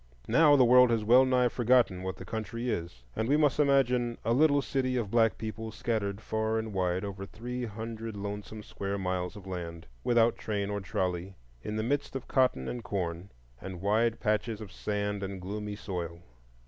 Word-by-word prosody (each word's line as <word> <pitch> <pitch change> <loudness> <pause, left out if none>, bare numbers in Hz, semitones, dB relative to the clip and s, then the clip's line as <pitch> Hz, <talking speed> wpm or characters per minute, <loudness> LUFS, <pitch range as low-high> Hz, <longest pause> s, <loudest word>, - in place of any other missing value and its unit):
Now 155 -3 +6
the 130 -3 +6
world 125 +1 +7
has 115 -2 +1
well 125 +4 +6
nigh 125 -1 +3
forgotten 120 -6 +3
what 95 0 -3
the - - -9
country 115 +2 -3
is, 85 - -5
and 110 - -1
we 145 - +4
must 150 -2 +2
imagine 125 -4 +3
a 115 - +3
little 145 +1 +4
city 130 -2 0
of 110 -5 -2
black 115 -2 +3
people 110 0 -5
scattered 110 -2 -2
far 110 0 -1
and 110 -1 -3
wide 90 0 0
over 100 -1 -6
three 120 +5 -5
hundred 110 0 -6
lonesome 105 +1 -6
square 100 0 -4
miles 90 -1 -2
of 100 -2 -11
land, 85 -3 -6 0.2
without 120 -1 +3
train 100 -2 -2
or 100 0 -2
trolley, 95 0 -2 0.3
in 105 - -4
the 110 - -1
midst 140 +3 -1
of 135 - -5
cotton 125 - +2
and 120 -1 -4
corn, 90 -3 -3 0.3
and 95 -2 -7
wide 115 +3 +2
patches 110 0 0
of 105 -4 -9
sand 105 -1 -2
and 95 -1 -4
gloomy 105 +3 -5
soil. 85 -4 -5
110 Hz, 185 wpm, -30 LUFS, 100-120 Hz, 0.3 s, world